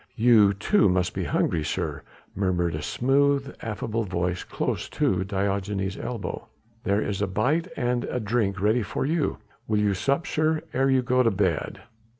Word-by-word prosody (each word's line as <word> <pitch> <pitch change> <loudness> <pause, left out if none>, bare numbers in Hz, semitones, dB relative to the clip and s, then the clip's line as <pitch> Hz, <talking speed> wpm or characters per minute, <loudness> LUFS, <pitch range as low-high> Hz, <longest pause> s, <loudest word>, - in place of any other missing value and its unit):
"You, 110 -3 +5
too, 180 - +3
must 90 0 +1
be - - -2
hungry, 80 -2 0
sir," 75 - -3 0.3
murmured 90 -3 0
a 75 - -3
smooth 140 - +1
affable 115 +1 -2
voice 90 -2 -2
close - - -3
to 95 -1 +1
Diogenes' 100 0 -2
elbow. 120 -2 -5 0.4
"There 100 +2 +2
is 100 -1 -3
a 105 - +1
bite 135 - 0
and 120 -1 0
a 125 - -2
drink 105 -3 0
ready 110 +5 +2
for 105 - -2
you; 155 +1 0 0.3
will 110 - +1
you 105 -1 +2
sup, 140 - 0
sir, 155 0 0
ere 135 +1 +2
you 130 -1 +3
go 125 +1 +2
to 115 - +4
bed?" 95 -6 -1
105 Hz, 165 wpm, -25 LUFS, 95-125 Hz, 0.4 s, You